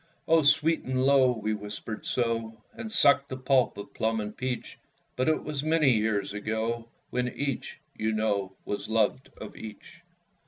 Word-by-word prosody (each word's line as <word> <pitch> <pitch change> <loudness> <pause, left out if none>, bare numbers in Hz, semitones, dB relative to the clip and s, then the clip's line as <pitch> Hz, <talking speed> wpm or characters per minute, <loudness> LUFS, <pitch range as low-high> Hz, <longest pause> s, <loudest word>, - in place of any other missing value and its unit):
Oh, 165 0 +5
sweet 155 +2 +4
and 130 0 0
low, 135 -2 +5
we 110 -2 -2
whispered 105 +1 -6
so, 115 -2 -1 0.2
And 220 - -7
sucked 140 -8 +5
the 130 - -4
pulp 130 -4 +2
of 100 - -8
plum 110 0 0
and 105 0 -5
peach; 125 -1 -4 0.4
But 130 +4 +1
it 155 - +1
was 150 -3 -3
many 155 -2 +3
years 105 -3 +1
ago, 110 +2 -2 0.2
When 125 0 0
each, 140 +1 -4 0.2
you 110 0 -1
know, 105 -3 0
was 100 +1 -4
loved 115 +4 +1
of 110 - -9
each. 110 +9 -10
115 Hz, 165 wpm, -28 LUFS, 110-135 Hz, 0.4 s, Oh